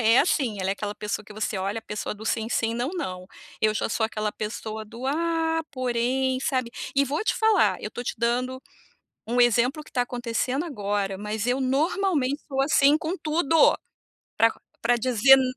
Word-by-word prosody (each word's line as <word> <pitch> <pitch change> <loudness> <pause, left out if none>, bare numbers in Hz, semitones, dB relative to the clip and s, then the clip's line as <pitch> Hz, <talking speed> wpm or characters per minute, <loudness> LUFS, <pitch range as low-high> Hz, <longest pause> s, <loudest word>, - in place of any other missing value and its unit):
é 230 +2 +5
assim, 270 - +2
ela 190 +1 0
é - - +2
aquela 205 0 -4
pessoa 210 0 -4
que 210 - -12
você 215 -1 -2
olha 200 +4 -2
a - - -33
pessoa 210 -1 -4
do 215 - -10
sim, 225 0 -1
sim, 225 -1 0
não, 240 +3 -1
não. 185 - -4 0.3
Eu 215 0 +3
já - - -1
sou 220 - +1
aquela 215 -1 -2
pessoa 215 0 -5
do: 230 +4 -10
"Ah 325 +2 +1
porém", 255 +1 0
sabe. 255 -3 -1 0.2
E 280 +1 +4
vou 285 +7 -1
te - - +2
falar, 440 -1 +3
eu - - -4
estou 245 - -7
te - - -2
dando 250 +3 -1 0.7
um 240 +2 0
exemplo 245 +5 +3
que - - -16
está 250 - +1
acontecendo 245 +5 -2
agora, 205 - -2
mas 210 +2 -3
eu 255 +2 +1
normalmente 290 +1 +1
sou 270 -2 -3
assim 280 +1 +5
com 320 +4 -3
tudo, 320 0 +3 0.6
pra 225 +1 +5 0.3
pra 240 +1 +3
dizer 255 +2 +6
nã 265 - +2
245 Hz, 195 wpm, -25 LUFS, 220-275 Hz, 0.7 s, dizer